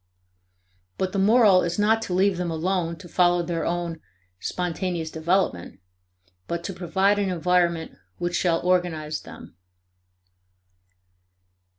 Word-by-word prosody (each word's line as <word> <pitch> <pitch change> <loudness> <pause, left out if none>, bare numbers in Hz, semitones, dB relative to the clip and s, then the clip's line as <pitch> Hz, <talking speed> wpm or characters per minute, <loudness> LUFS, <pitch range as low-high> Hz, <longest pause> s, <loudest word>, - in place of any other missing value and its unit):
But 190 -1 -1
the 195 - -1
moral 205 -2 +5
is 170 0 -2
not 220 +2 +3
to 190 - -4
leave 190 0 +2
them 180 -1 -2
alone 170 +1 -1
to 165 - -12
follow 175 0 +2
their 165 -1 -2
own 170 -2 -3 0.4
"spontaneous 175 - -3
development," 160 - -1 0.7
but 170 0 -3
to 195 - -4
provide 190 +3 +1
an 200 -2 0
environment 175 -1 +1 0.3
which 175 0 -2
shall 170 -2 +2
organize 170 -4 0
them. - - -12
175 Hz, 120 wpm, -24 LUFS, 165-190 Hz, 0.7 s, moral